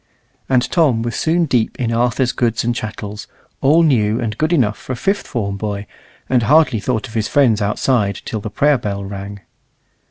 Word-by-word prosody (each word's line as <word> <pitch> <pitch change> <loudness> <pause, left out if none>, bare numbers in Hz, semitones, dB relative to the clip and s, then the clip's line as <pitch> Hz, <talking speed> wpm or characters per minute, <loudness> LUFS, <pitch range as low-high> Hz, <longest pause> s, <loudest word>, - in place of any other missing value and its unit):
And 125 -2 +3
Tom 140 -10 +2
was 120 0 -3
soon 165 +2 +1
deep 125 -6 0
in 115 -2 -1
Arthur's 125 +2 +1
goods 115 -3 0
and 120 +1 0
chattels, 105 -2 -6 0.3
all 155 +5 +4
new, 115 -7 +2
and 110 -3 -3
good 155 +7 0
enough 120 -11 +2
for 130 - -5
a - - -3
fifth 195 +10 -1
form 100 -6 -3
boy, 105 0 -4 0.4
and 125 -2 +2
hardly 130 -1 +4
thought 125 +3 -2
of 110 - -13
his 110 -2 -1
friends 120 -7 +3
outside 105 -1 0
till 110 - -3
the 110 - -5
prayer 145 +4 +2
bell 100 -2 -4
rang. 100 0 -7
115 Hz, 190 wpm, -18 LUFS, 105-135 Hz, 0.4 s, all